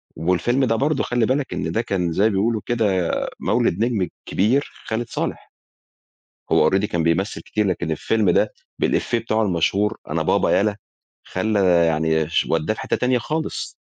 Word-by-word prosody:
والفيلم 90 +11 +1
ده 115 -2 +1
برضه 145 +7 +1
خلي 120 -2 +1
بالك 130 +3 -1
إن 80 - -3
ده 115 - 0
كان 95 -7 -1
زي 95 +5 +1
ما 110 - +5
بيقولوا 110 +2 0
كده، 105 -7 +1 0.4
مولد 110 -1 +1
نجم 110 -7 0 0.2
كبير 120 +9 +1 0.2
خالد 115 +1 -2
صالح. - - -4 1.0
هو - - +5
already 95 +1 +1
كان 85 -5 -1
بيمثل 85 +6 0
كتير، 105 -1 -1
لكن 85 -3 -1
الفيلم 105 +5 +1
ده - - +2 0.3
بالإيفيه 120 - +1
بتاعه 110 -1 0
المشهور 100 +3 +1
"أنا - - -1
بابا - - +2
يلّا." 105 0 0 0.5
خلّى 95 -4 +2
يعني 80 -1 +1
ش 80 - +1
ودّاه 80 +6 +1
في - - -9
حِتّة - - -1
تانية 125 0 +1
خالص. 155 +6 -3
105 Hz, 170 wpm, -22 LUFS, 90-115 Hz, 1.0 s, ما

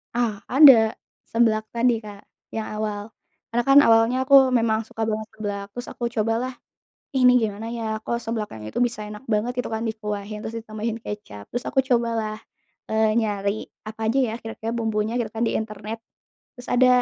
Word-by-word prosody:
Ah 230 -4 -1
ada, 255 -5 +7 0.4
seblak 220 -2 +3
tadi 235 0 +2
Kak 210 -2 -10 0.3
yang 220 -1 -3
awal. 210 0 -3 0.4
Karena 240 +1 0
kan 275 +1 +8
awalnya 225 0 +4
aku 265 -1 +6
memang 225 -2 +2
suka 225 0 -3
banget 215 0 -2
seblak, 205 -2 -4
terus 245 0 -6
aku 240 - -5
cobalah 225 +4 0 0.6
"Ih 255 - +3
ini 250 0 +7
gimana 220 +1 -3
ya 220 -2 -3
kok 235 0 -2
seblak 225 -2 -4
yang 110 -1 -8
itu - - -11
bisa 235 -3 -3
enak 210 +4 -9
banget 235 +4 0
gitu 250 - -2
kan 220 - -1
dikuahin 210 -1 -5
terus 220 - -4
ditambahin 220 +1 -4
kecap," 205 - -8
terus 245 +1 -4
aku 270 - +2
cobalah, 230 -3 0 0.6
eee, 220 0 +2
nyari 205 -2 0 0.2
apa 220 +1 -10
aja 275 - +1
ya 220 - -3
kira-kira 225 0 -5
bumbunya 220 0 -1
gitu 230 -3 -2
kan 225 - -5
di - - 0
internet. 220 +1 -5 0.5
Terus 245 - -11
ada, 250 +1 +5
225 Hz, 180 wpm, -24 LUFS, 215-235 Hz, 0.6 s, kan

